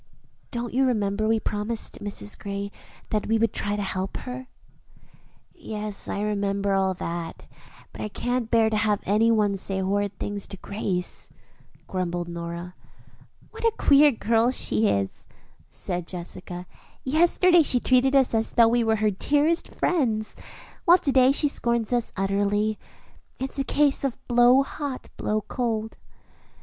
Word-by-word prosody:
"Don't 240 -1 -4
you 265 +2 +3
remember 215 -3 0
we 225 0 +2
promised 215 +2 -3
Mrs. 150 - -2
Gray 200 0 -5 0.4
that 215 -1 -1
we 225 - +2
would 225 -1 +1
try 205 0 -1
to 205 - -2
help 190 0 -3
her?" 255 0 -7 1.1
"Yes, 210 -1 -4
I 200 - -3
remember 200 -1 0
all 190 -1 +1
that; 170 -1 -5 0.5
but - - -9
I - - -2
can't 245 +2 -2
bear 225 -1 +3
to 215 - +1
have 210 -1 +1
any 215 +4 +3
one 210 -3 +2
say 190 0 -2
horrid 200 +1 -1
things 205 -1 -2
to 195 - -7
Grace," 185 -2 -3 0.6
grumbled 175 -2 -3
Nora. 170 +1 -6 0.8
"What - - -10
a 460 - +4
queer 290 +1 +6
girl 230 0 +2
she 225 -3 +1
is," 100 - -2 0.4
said 175 -2 -4
Jessica. 180 0 -6 0.4
"Yesterday 345 +4 +4
she 260 -5 +4
treated 255 +2 +3
us 265 -3 +4
as 225 0 0
though 230 -1 +6
we 240 0 +2
were 220 -1 +2
her 215 -1 +1
dearest 295 - +1
friends, 230 -11 -1 0.5
while 350 -1 +7
to 285 - -1
day 260 0 +5
she 295 +2 +3
scorns 235 -4 -1
us 240 -2 0
utterly. 205 +2 0 0.6
It's 265 +1 -4
a - - +2
case 285 0 +1
of 270 -3 -1
'blow 245 +2 +5
hot, 280 -1 -6
blow 215 0 -1
cold.'" 220 0 -3
215 Hz, 155 wpm, -25 LUFS, 200-250 Hz, 1.1 s, while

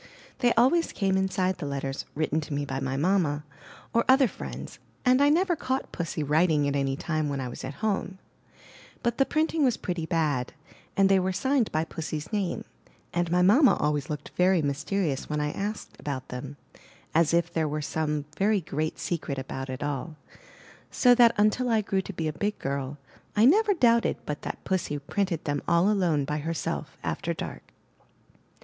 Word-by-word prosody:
They 245 -2 +4
always 265 +9 +3
came 195 -2 +1
inside 190 -1 0
the 145 - -4
letters, 135 -1 -3
written 155 +1 0
to 150 -1 -5
me 145 0 -1
by 135 -1 -3
my 135 0 -2
mamma, 155 -3 +1 0.5
or 235 - +3
other 265 0 +6
friends, - - -8 0.3
and 255 +2 +5
I 285 - +6
never 350 +3 +3
caught 260 -3 -2
Pussy 165 -3 -3
writing 150 0 +3
at 140 - 0
any 135 -1 0
time 155 0 -1
when 140 -1 -2
I 130 - -3
was 120 - -8
at 140 +11 -5
home; 195 -2 -1 0.9
but 235 0 0
the 270 - +4
printing 315 0 +1
was 255 -4 +3
pretty 175 -4 -3
bad, 150 -8 0 0.4
and 195 0 +5
they 195 0 +4
were 185 +1 0
signed 260 +4 +1
by 155 +1 +1
Pussy's 160 +2 -5
name; 200 -4 -1 0.5
and 175 -1 0
my 180 +1 +3
mamma 245 +9 +6
always 150 -2 -1
looked 150 -1 -5
very 180 -2 +3
mysterious 150 +1 -1
when 150 0 -1
I 150 0 0
asked 205 +4 -5
about 135 -3 -5
them, 130 +3 -7 0.6
as 165 -1 +4
if 170 0 +1
there 160 -1 +1
were 150 +1 -2
some 150 -1 -1
very 205 +4 +2
great 155 0 -3
secret 155 -3 -3
about 135 0 -5
it 130 +2 -4
all; 145 +2 -3 0.7
so 245 -1 +5
that 240 -1 +6
until 215 +4 +2
I 225 -2 +3
grew 195 -2 0
to 195 - -7
be 165 -4 -3
a 155 - -2
big 205 +6 -2
girl, 140 +1 -3 0.4
I 215 +2 +5
never 410 - +5
doubted 235 -6 +3
but 150 -1 -4
that - - -6
Pussy 180 -6 -1
printed 170 +3 -2
them 145 -1 -1
all 170 +4 +4
alone 170 -8 +1
by 150 +2 -2
herself, 165 +1 -3
after - - -2
dark. - - -7
170 Hz, 185 wpm, -27 LUFS, 145-210 Hz, 0.9 s, other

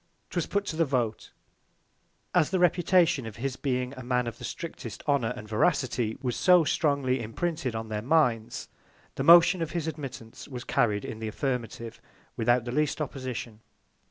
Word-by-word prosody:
'Twas - - -1
put 200 0 -1
to 165 - -4
the 165 - +3
Vote. 125 -7 -2 1.0
As 170 -4 +3
the 190 - +1
Reputation 175 -6 +3
of 110 - -8
his 130 +2 -3
being 125 -2 -2
a 130 - -8
Man 125 0 0
of 115 -1 -6
the - - -10
strictest 140 - -6
Honour 135 -5 +2
and 105 - -9
Veracity 120 -1 +1
was 125 -2 -1
so 180 -2 +5
strongly 140 -5 +1
imprinted 135 +3 -3
on 110 0 -4
their 105 -1 -2
Minds, 120 -5 +1 0.5
the - - -3
Motion 175 +1 +7
of 165 - -3
his 170 -3 -2
Admittance 135 -7 -7
was 125 -3 -7
carried 105 -5 +1
in 110 - -6
the 110 - -4
Affirmative, 115 -1 -4 0.3
without 120 +1 +2
the 120 - -3
least 150 +3 0
Opposition. 130 -6 -5
130 Hz, 170 wpm, -28 LUFS, 115-155 Hz, 1.0 s, Motion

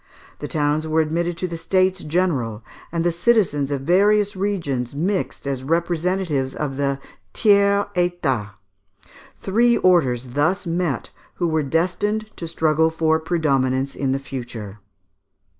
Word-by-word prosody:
The - - -5
towns 150 +1 0
were 155 +1 +1
admitted 165 +2 0
to 185 - -2
the 170 -1 -5
states 185 +2 +1
general, 145 - -1 0.3
and 165 0 -1
the 175 - +2
citizens 170 -7 +2
of 140 -2 -2
various 200 +6 +3
regions 165 -11 -2
mixed 185 +3 -2
as 135 -2 -3
representatives 170 -2 0
of 140 -3 -3
the 140 -1 0 0.4
Tiers 200 -2 +4
Etat. 145 - -1 0.8
Three 235 +4 +2
orders 130 -9 +2
thus 165 +8 +1
met, 170 -6 -2 0.2
who 175 - 0
were 160 -1 +1
destined 185 +8 -1
to 170 - -5
struggle 160 -1 +2
for 160 0 +1
predominance 140 -5 0
in 135 -2 -1
the 135 - +1
future. 120 -6 -7
160 Hz, 135 wpm, -22 LUFS, 140-185 Hz, 0.8 s, Tiers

